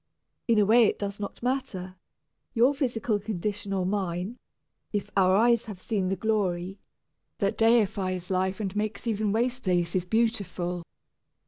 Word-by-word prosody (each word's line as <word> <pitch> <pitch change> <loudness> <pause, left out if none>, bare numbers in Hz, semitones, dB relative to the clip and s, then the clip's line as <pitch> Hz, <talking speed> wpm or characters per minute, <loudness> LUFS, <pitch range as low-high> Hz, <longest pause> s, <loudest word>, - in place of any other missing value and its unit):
In 230 -2 +4
a 210 - +5
way 230 +3 +6
it - - +1
does 200 0 -4
not 205 +3 -6
matter, 195 -8 -2 0.6
your 245 +5 +5
physical 240 -6 0
condition 205 0 -3
or 190 -2 0
mine, 190 +2 -2 0.5
if 205 -2 -3
our 190 -1 +4
"eyes 235 +2 +4
have 210 -5 -8
seen 195 -1 -1
the 195 - +1
glory" 190 -2 -1 0.6
that 200 -1 0
deifies 200 -5 +2
life 190 +1 0
and 200 -2 -3
makes 210 0 -2
even 215 -2 0
its 200 - +1
waste 250 +2 0
places 175 0 +1
beautiful. 185 -5 0
205 Hz, 150 wpm, -27 LUFS, 185-225 Hz, 0.6 s, way